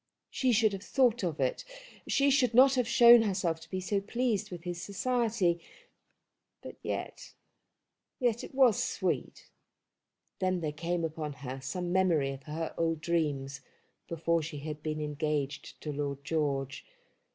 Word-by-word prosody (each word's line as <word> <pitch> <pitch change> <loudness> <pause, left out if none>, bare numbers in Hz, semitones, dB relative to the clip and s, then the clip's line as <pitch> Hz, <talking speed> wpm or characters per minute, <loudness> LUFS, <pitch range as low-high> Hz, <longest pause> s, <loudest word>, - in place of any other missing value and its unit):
She 260 -2 +1
should 220 -2 +3
have 195 - -5
thought 240 +1 +2
of 170 -5 -2
it; 130 -2 0 0.4
she 280 0 +3
should 250 -4 +2
not 265 +2 +7
have 250 -3 +1
shown 235 0 +8
herself 185 -6 0
to - - -14
be 185 - -3
so 195 +2 -1
pleased 215 -1 -1
with 175 -2 -8
his 175 -1 -5
society. 210 -5 0 1.0
But - - -9
yet, - - -5 0.8
yet 240 -3 +1
it - - -10
was 255 -5 +4
sweet. - - -3 0.9
Then 185 -2 0
there 155 -2 -2
came 170 +3 -2
upon 155 -2 -4
her 130 +1 -5
some 175 +6 -3
memory 170 -7 +2
of 135 0 -8
her 160 +1 -4
old 165 -1 +1
dreams, 150 -5 -1 0.5
before 170 0 0
she 150 -1 -6
had 150 0 -6
been 155 0 -3
engaged 150 -1 -3
to 150 - -4
Lord 140 -1 -4
George. 140 -4 -1
170 Hz, 150 wpm, -30 LUFS, 150-215 Hz, 1.0 s, shown